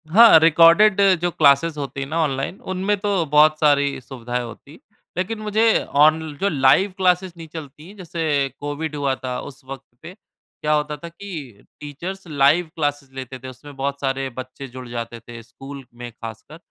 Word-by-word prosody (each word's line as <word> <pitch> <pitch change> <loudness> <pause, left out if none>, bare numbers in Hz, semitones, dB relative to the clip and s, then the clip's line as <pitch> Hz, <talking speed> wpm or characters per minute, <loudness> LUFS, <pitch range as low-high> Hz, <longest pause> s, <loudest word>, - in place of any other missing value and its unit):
हाँ, 220 -1 +8
रिकॉर्डेड 170 +6 +5 0.2
जो 175 - +1
क्लासेस 150 +1 +3
होती 140 -1 -5
है - - -3
ना, 160 - -2
ऑनलाइन 135 +4 -3
उनमें 190 +3 0
तो 200 -4 0
बहुत 155 +1 +4
सारी 145 -2 +2
सुविधाएँ 125 -1 -5
होती 120 +4 -11
हैं। 155 - -15 0.4
लेकिन 205 +5 -2
मुझे 215 +1 +2 0.2
ऑन 155 +1 +5 0.2
जो 200 - +2
लाइव 145 +7 +3
क्लास 180 -1 +3
नहीं 165 -1 -9
चलती, 155 +3 -10
जैसे 160 -7 -1
कोविड 145 +2 -4
हुआ 140 -2 0
था 125 -1 -3
उस 135 - -11
वक़्त 135 0 -8 0.2
पे 175 - -10 0.5
क्या 150 0 +1
होता 150 0 -1
था 170 +3 -9
कि 160 - -9 0.2
टीचर्स 175 +6 -7
लाइव 150 +3 +3
क्लासेस 145 -3 -2
लेते 130 -1 -8
थे। 130 - -10
उसमें 140 +3 -13
बहुत 140 +1 -3
सारे 135 0 -2
बच्चे 130 +2 -9
जुड़ 130 0 -10
जाते 115 0 -6
थे 115 0 -11
स्कूल 135 +3 -11
में 120 0 -9
खासकर, 115 +7 -10
145 Hz, 175 wpm, -21 LUFS, 135-170 Hz, 0.5 s, हाँ